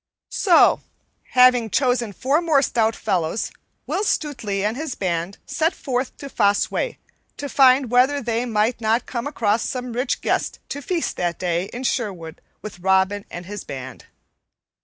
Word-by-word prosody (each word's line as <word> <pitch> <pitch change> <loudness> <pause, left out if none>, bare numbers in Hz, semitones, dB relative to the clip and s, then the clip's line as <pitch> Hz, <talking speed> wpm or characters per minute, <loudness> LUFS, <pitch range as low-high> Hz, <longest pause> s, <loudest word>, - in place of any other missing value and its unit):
So, 360 -5 +4 0.5
having 250 -2 +5
chosen 245 -3 +1
four 275 - +1
more 310 -5 +3
stout 225 -3 +1
fellows, 185 -1 -1 0.3
Will 400 - -1
Stutely 230 - -1
and 215 +2 0
his 295 -1 -4
band 175 0 -2
set 325 +2 0
forth 255 -1 -3
to 280 - -8
Fosse 205 -6 +2
Way, - - -2 0.4
to 285 - -4
find 260 -2 +4
whether 260 +4 +4
they 240 -1 -1
might 225 +2 0
not 225 +2 +1
come 240 +1 -4
across 225 -6 +1
some 250 -2 -4
rich 250 +2 -1
guest - - -1
to 285 - -4
feast 335 +4 -2
that 175 -2 -1
day 175 0 -1
in 245 +5 -7
Sherwood 185 -11 -3 0.2
with 205 -4 -8
Robin 190 +2 +2
and 175 +1 -7
his 205 0 -7
band. 130 -2 -8
235 Hz, 160 wpm, -22 LUFS, 200-265 Hz, 0.5 s, having